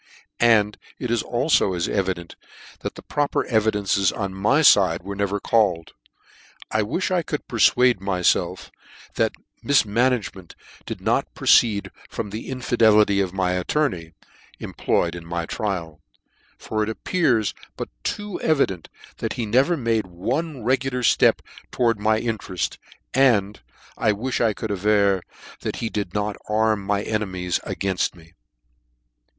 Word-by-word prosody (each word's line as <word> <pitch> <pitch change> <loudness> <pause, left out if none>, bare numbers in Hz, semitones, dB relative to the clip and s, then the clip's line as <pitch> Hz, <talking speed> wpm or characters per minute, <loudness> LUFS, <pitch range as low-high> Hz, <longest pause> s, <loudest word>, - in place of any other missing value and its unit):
And 110 -3 +3 0.2
it 125 - -4
is 120 - +2
alfo 120 - +1
as 85 - -1
evident, 95 -4 -2 0.4
that - - -5
the - - -11
proper 145 -1 -1
evidences 105 -3 +1
on 100 -3 -4
my 110 +11 +2
fide 95 - +5
were 100 +1 -6
never 100 0 -1
called: 95 -8 +1 0.8
I 110 - +2
wilh 150 - -2
I 180 -1 +2
could 150 -2 -5
perfuade 120 0 +3
myfelf 95 -2 0 0.4
that - - +1 0.3
mif 140 -5 +4
managemcnt 105 -5 -1 0.3
did - - -6
not - - 0
proceed 105 -4 +3 0.2
from 105 -3 -5
the 110 +2 -6
infidelity 110 -6 +3
of 95 -2 -1
my 95 -1 0
attorney, 90 - -1 0.5
employed 85 0 -1
on 85 - -8
my 85 0 -3
trial: 85 -6 -4 0.6
for 110 - -3
it 105 - 0
ap 110 - -7
pears 125 - +1 0.2
but - - -5
too 205 -2 -4
evident, 135 - 0 0.3
that - - -3
he 120 - -3
never 130 +11 +2
made 115 -6 0
one 125 - -3
regular 130 +1 0
ftep - - +4 0.3
towards 115 -3 +1
my 110 +1 +2
intereft 105 -7 -3
j - - -13 0.4
and, 105 - +3 0.4
I 110 - +3
wilh 120 +4 -2
I 110 -2 +2
could 110 +1 -5
aver 100 -1 +2 0.4
that - - -4
he 115 - -3
did 100 -3 -4
not 105 0 -1
arm. 110 -1 +2
my 100 +1 0
enemies 95 -5 -2
3 - - -3
gainft 95 -2 -1
me. 80 -1 -18
105 Hz, 145 wpm, -23 LUFS, 95-120 Hz, 0.8 s, fide